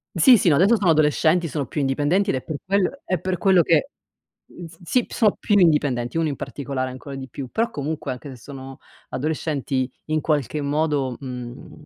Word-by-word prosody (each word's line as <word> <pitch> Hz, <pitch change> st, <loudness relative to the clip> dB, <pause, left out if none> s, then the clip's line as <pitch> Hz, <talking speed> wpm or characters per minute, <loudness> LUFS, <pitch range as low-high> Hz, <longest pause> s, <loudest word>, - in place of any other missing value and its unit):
Sì, 250 Hz, -5 st, +7 dB
sì, 180 Hz, -, +2 dB
no 150 Hz, -, +5 dB
adesso 200 Hz, +8 st, +5 dB
sono 190 Hz, -6 st, +2 dB
adolescenti, 155 Hz, +2 st, +3 dB
sono 140 Hz, 0 st, -3 dB
più 150 Hz, -, -4 dB
indipendenti 145 Hz, +8 st, +1 dB
ed -, -, 0 dB
è 130 Hz, -, -4 dB
per 155 Hz, -, -5 dB
quel 200 Hz, +8 st, 0 dB
è 185 Hz, -, -1 dB
per 185 Hz, -1 st, -2 dB
quello 185 Hz, -3 st, +4 dB
che 165 Hz, -, +2 dB, 0.6 s
mhmm, 175 Hz, -, -11 dB
s 165 Hz, 0 st, -15 dB
sì, 245 Hz, +7 st, +1 dB
sono 215 Hz, -4 st, +2 dB
più 205 Hz, -, +1 dB
indipendenti, 145 Hz, -7 st, +2 dB
uno 160 Hz, -, +1 dB
in 145 Hz, -, -2 dB
particolare 135 Hz, -2 st, -4 dB
ancora 135 Hz, +2 st, -9 dB
di 135 Hz, -1 st, -7 dB
più, 135 Hz, -2 st, -7 dB
però 230 Hz, +1 st, 0 dB
comunque, 150 Hz, -2 st, -4 dB
anche 130 Hz, +3 st, -8 dB
se 130 Hz, -, -10 dB
sono 135 Hz, +1 st, -10 dB, 0.3 s
adolescenti 140 Hz, -3 st, -2 dB, 0.2 s
in 155 Hz, 0 st, 0 dB
qualche 150 Hz, -1 st, -1 dB
modo, 145 Hz, -3 st, 0 dB
mhmm, 125 Hz, +3 st, -8 dB
150 Hz, 195 wpm, -23 LUFS, 135-175 Hz, 0.6 s, Sì